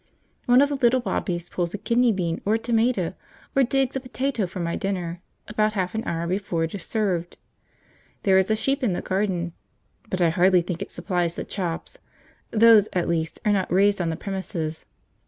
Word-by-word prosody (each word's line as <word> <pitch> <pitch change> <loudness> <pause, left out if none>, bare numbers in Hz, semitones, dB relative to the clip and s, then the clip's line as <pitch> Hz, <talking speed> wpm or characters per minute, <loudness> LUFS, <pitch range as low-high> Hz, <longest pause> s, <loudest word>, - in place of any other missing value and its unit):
One 250 +3 +6
of 285 - +1
the 285 - -1
little 255 -1 +4
Bobbies 175 -7 -2
pulls 175 +1 -2
a - - -3
kidney 235 +3 +2
bean 175 -4 -2
or 210 +2 +2
a - - +3
tomato 225 -5 +1 0.4
or 275 - +5
digs 270 +1 +1
a - - 0
potato 255 -4 -2
for 185 +1 -7
my 170 -1 -1
dinner, 180 -4 -3 0.3
about 215 0 +1
half 185 -3 -1
an 220 +1 -2
hour 170 0 -1
before 180 -2 -1
it 165 - -3
is 200 - -5
served. 185 -6 -1 0.9
There 190 -1 +5
is 190 - +1
a 220 - +3
sheep 270 +6 0
in 230 -8 +1
the - - -3
garden, 185 -3 -1 0.6
but 185 - -2
I 170 -2 +4
hardly 180 +1 +4
think 175 -1 -4
it - - -4
supplies 175 -3 -2
the - - -4
chops; 180 - -4 0.5
those, 220 -2 +6
at 180 -2 0
least, 165 -1 -1
are 210 - +4
not 195 -2 0
raised 200 +1 +3
on 170 - 0
the 160 - -2
premises. 170 -5 -4
195 Hz, 200 wpm, -24 LUFS, 175-225 Hz, 0.9 s, One